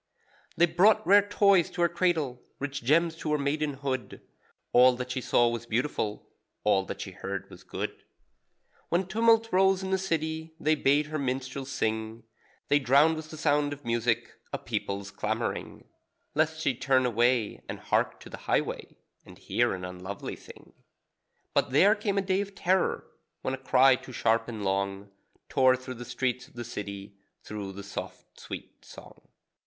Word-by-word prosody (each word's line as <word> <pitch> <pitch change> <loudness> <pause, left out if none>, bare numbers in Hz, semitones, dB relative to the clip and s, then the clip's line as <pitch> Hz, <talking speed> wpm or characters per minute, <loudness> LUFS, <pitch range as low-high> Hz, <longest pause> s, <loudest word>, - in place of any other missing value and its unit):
They 170 - +6
brought 175 +5 +4
rare 200 +4 +7
toys 200 -4 +4
to 175 - -1
her - - +5
cradle, 165 -8 0 0.2
rich 140 -2 -4
gems 165 +6 +3
to 155 -2 -2
her - - +3
maidenhood; 140 -3 -2 0.5
All 125 +1 +7
that 125 0 -5
she 130 0 -2
saw 120 -1 +3
was 120 0 -3
beautiful, 115 -3 -2 0.4
all 95 -2 +3
that - - -6
she - - -6
heard - - -5
was - - -12
good. - - -5 0.9
When 180 +3 +1
tumult 225 +3 +3
rose 190 0 +4
in 190 - -3
the 190 - +2
city 160 -3 -2
they 155 -1 +3
bade 145 0 +3
her 155 +1 -4
minstrels 130 0 -3
sing; 110 +1 -2 0.4
They 145 - +4
drowned 140 +5 +4
with 155 0 -7
the 155 - -9
sound 145 -1 +2
of 145 -3 -12
music 115 0 0 0.2
a - - -2
people's 100 0 -4
clamouring; - - -3 0.5
(Lest 155 +1 +1
she 140 - +2
turn 130 +1 +2
and 120 -1 0
hark - - 0
to - - -11
the - - -7
highway, - - -1 0.3
And - - -14
hear - - 0
an 90 -1 -6
unlovely 90 +2 -6
thing.) - - -15 0.8
But - - +2
there 185 +11 +6
came 205 -2 -2
a 195 - +2
day 190 0 +1
of 200 -1 -7
terror, 185 +1 +1 0.4
when 130 - -1
a - - -2
cry 130 0 +5
too 130 - -12
sharp 115 0 +1
and 110 -4 -5
long 100 +1 -2 0.4
Tore 130 -3 +4
through 130 0 -7
the 120 0 -8
streets 125 0 -2
of - - -24
the 120 - -5
city, 100 -3 -7 0.2
through 100 -2 -6
the 100 +1 -8
soft, 100 - -8
sweet - - -9
song. - - -14
135 Hz, 170 wpm, -28 LUFS, 115-160 Hz, 0.9 s, rare